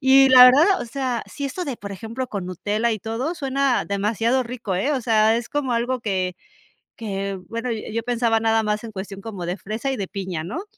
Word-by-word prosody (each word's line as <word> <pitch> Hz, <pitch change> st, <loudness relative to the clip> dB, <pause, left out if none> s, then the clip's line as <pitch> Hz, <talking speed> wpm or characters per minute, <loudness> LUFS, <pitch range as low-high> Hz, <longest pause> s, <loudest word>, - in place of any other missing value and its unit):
Y, 270 Hz, 0 st, +6 dB
la 255 Hz, -1 st, +10 dB
verdad, 310 Hz, +10 st, +6 dB
o -, -, -3 dB
sea, 250 Hz, -1 st, -2 dB
si 285 Hz, -, -6 dB
esto 350 Hz, +7 st, -3 dB
de, 270 Hz, -5 st, -4 dB
por 200 Hz, 0 st, -8 dB
ejemplo, 230 Hz, +6 st, -5 dB
con 195 Hz, -5 st, -5 dB
Nutella 210 Hz, +6 st, -1 dB
y 215 Hz, -, -3 dB
todo 235 Hz, -, -3 dB
suena 275 Hz, -3 st, 0 dB
demasiado 225 Hz, +5 st, 0 dB
rico, 235 Hz, -5 st, -4 dB
¿eh?, 235 Hz, +12 st, 0 dB
o 270 Hz, -, 0 dB
sea, 220 Hz, -1 st, +3 dB
es 235 Hz, -, -4 dB
como 280 Hz, -4 st, -1 dB
algo 245 Hz, +2 st, 0 dB
que 185 Hz, -4 st, -1 dB, 0.7 s
que, 195 Hz, -2 st, -3 dB
bueno, 230 Hz, +2 st, -3 dB
yo 220 Hz, -, -3 dB
yo 230 Hz, +1 st, -1 dB
pensaba 235 Hz, -1 st, +1 dB
nada 225 Hz, 0 st, +2 dB
más 210 Hz, +1 st, -1 dB
en 225 Hz, -, -7 dB
cuestión 195 Hz, 0 st, -7 dB
como 200 Hz, -6 st, -6 dB
de 175 Hz, +2 st, -2 dB
fresa 220 Hz, +7 st, -4 dB
y 260 Hz, -, -3 dB
de 195 Hz, -2 st, -3 dB
piña, 185 Hz, -5 st, -4 dB
¿no? 325 Hz, -, -5 dB
230 Hz, 225 wpm, -22 LUFS, 205-260 Hz, 0.7 s, la